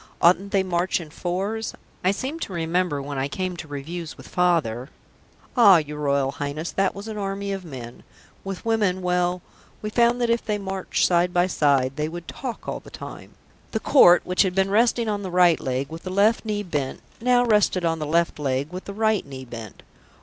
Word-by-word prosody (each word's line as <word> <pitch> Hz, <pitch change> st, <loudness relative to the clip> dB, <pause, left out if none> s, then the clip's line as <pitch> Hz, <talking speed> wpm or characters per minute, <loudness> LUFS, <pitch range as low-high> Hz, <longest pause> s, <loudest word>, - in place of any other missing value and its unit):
"Oughtn't 185 Hz, +3 st, +4 dB
they 195 Hz, -1 st, +3 dB
to -, -, -8 dB
march 180 Hz, +1 st, +1 dB
in 160 Hz, -3 st, -9 dB
fours? 195 Hz, +7 st, -3 dB, 0.3 s
I 185 Hz, -, +4 dB
seem 260 Hz, +11 st, -2 dB
to 195 Hz, -, -5 dB
remember, 170 Hz, -3 st, 0 dB
when 140 Hz, -1 st, -4 dB
I 135 Hz, -, 0 dB
came 185 Hz, +5 st, -3 dB
to 160 Hz, -, -7 dB
reviews 155 Hz, +4 st, -6 dB
with -, -, -12 dB
Father 155 Hz, -9 st, +1 dB, 0.3 s
" -, -, -33 dB, 0.3 s
"Ah, 205 Hz, -7 st, +8 dB
your 150 Hz, -1 st, -4 dB
Royal 140 Hz, -2 st, +1 dB
Highness, 145 Hz, +4 st, -4 dB
that 195 Hz, -1 st, 0 dB
was 200 Hz, +2 st, -7 dB
an 215 Hz, -1 st, -5 dB
army 200 Hz, 0 st, -3 dB
of 195 Hz, -1 st, -4 dB
men. 125 Hz, -7 st, -9 dB, 0.4 s
With 195 Hz, +1 st, -6 dB
women 205 Hz, -5 st, +1 dB
well, 180 Hz, 0 st, 0 dB, 0.4 s
we 215 Hz, -, -3 dB
found 235 Hz, +2 st, +3 dB
that 240 Hz, -1 st, +1 dB
if 235 Hz, -, +1 dB
they 210 Hz, -1 st, -1 dB
marched 190 Hz, -1 st, -1 dB
side 175 Hz, 0 st, +3 dB
by 175 Hz, 0 st, +3 dB
side, 140 Hz, -6 st, +2 dB
they 150 Hz, +1 st, -1 dB
would 175 Hz, 0 st, -8 dB
talk 250 Hz, -4 st, -6 dB
all -, -, -3 dB
the -, -, -14 dB
time." -, -, -10 dB, 0.4 s
The 220 Hz, -, +1 dB
Court, 180 Hz, -9 st, +6 dB
which 180 Hz, 0 st, +2 dB
had 185 Hz, -2 st, +1 dB
been 195 Hz, 0 st, +2 dB
resting 230 Hz, +2 st, +3 dB
on 205 Hz, -1 st, -1 dB
the 190 Hz, -, -4 dB
right 180 Hz, -2 st, +4 dB
leg 130 Hz, +1 st, -2 dB
with 160 Hz, +1 st, -8 dB
the 185 Hz, -, -6 dB
left 205 Hz, +5 st, +2 dB
knee 210 Hz, -1 st, -1 dB
bent, 145 Hz, -8 st, -3 dB, 0.2 s
now 245 Hz, 0 st, +4 dB
rested 210 Hz, -5 st, +3 dB
on 165 Hz, -1 st, 0 dB
the 150 Hz, -, -3 dB
left 170 Hz, 0 st, +1 dB
leg 140 Hz, +3 st, -1 dB
with 185 Hz, -, -6 dB
the 200 Hz, -, -7 dB
right 220 Hz, -1 st, +2 dB
knee 130 Hz, -1 st, -9 dB
bent. 115 Hz, -4 st, -9 dB
180 Hz, 215 wpm, -24 LUFS, 150-200 Hz, 0.4 s, Ah